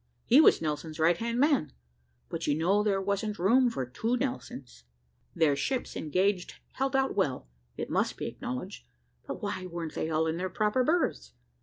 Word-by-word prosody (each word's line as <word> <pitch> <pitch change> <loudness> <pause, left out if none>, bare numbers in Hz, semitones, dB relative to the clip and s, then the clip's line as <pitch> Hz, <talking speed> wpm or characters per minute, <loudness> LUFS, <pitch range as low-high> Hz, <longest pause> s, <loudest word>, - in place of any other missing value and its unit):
He 265 +6 +7
was 310 - +5
Nelson's 155 +1 -3
right 165 +2 +4
hand 235 +3 -2
man; 280 - +2 0.5
but - - -4
you 145 - +2
know 185 +6 +2
there 205 -2 +1
wasn't 200 +2 -2
room 240 +8 +4
for 135 - -3
two 225 - -1
Nelsons. 235 - -5 0.5
Their 160 -4 +3
ships 255 - -2
engaged 185 +4 0 0.2
held 270 +1 -1
out 270 0 +1
well, 140 - -1 0.3
it - - -3
must - - 0
be - - -4
acknowledged, 125 - -6 0.4
but - - -6
why 185 -1 -3
wer'n't 170 -2 -5
they 160 - -2
all 160 0 +1
in 160 +1 -1
their 185 +1 -2
proper 215 +4 +1
berths? 245 - 0
190 Hz, 175 wpm, -29 LUFS, 155-240 Hz, 0.5 s, He